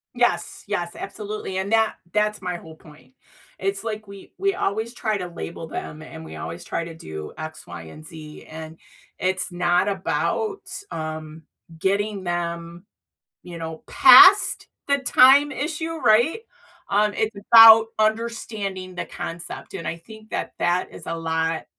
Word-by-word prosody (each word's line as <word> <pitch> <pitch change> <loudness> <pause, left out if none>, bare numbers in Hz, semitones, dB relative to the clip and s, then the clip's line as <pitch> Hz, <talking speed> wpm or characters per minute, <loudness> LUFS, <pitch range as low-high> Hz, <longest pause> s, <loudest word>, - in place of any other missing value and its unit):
Yes, 240 0 0
yes, 175 -4 -3
absolutely, 205 -1 -6
and 195 +3 -3
that 225 -1 +3 0.2
that's 210 0 0
my 180 -1 -3
whole 160 -1 -13
point. 150 -4 -18 0.5
It's 195 +2 -2
like 215 -2 -5
we 200 -1 -13
we 395 0 +1
always 220 - -2
try 215 -3 -1
to 180 -2 -5
label 170 -1 -7
them 155 -1 -7
and 160 +1 -10
we - - -10
always 175 - -7
try 170 - -3
to 165 -1 -9
do 80 - -8
X, 155 0 -8
Y, 85 -1 -8
and 115 - -12
Z, 155 -1 -11
and 160 0 -9 0.4
it's 185 +1 0
not 175 +2 +1
about, 395 - -2 0.3
um, 155 0 -6 0.3
getting 200 +2 -1
them, 170 0 -4 0.6
you 175 -1 -9
know, 160 -1 -7
past 375 +2 +7 0.2
the 280 0 +3
time 270 +3 +5
issue, 320 +3 -3
right? 240 - +3 0.5
Um, 210 +1 +2
it's 215 -1 -2 0.2
about 225 -1 +10
understanding 215 -4 -2
the - - -3
concept, 170 +3 -7
and 170 - -6
I 165 - -3
think 220 +5 -15
that - - -3
that 175 +1 0
is - - -10
a 165 - -3
lot 160 0 -2
190 Hz, 155 wpm, -23 LUFS, 165-220 Hz, 0.6 s, about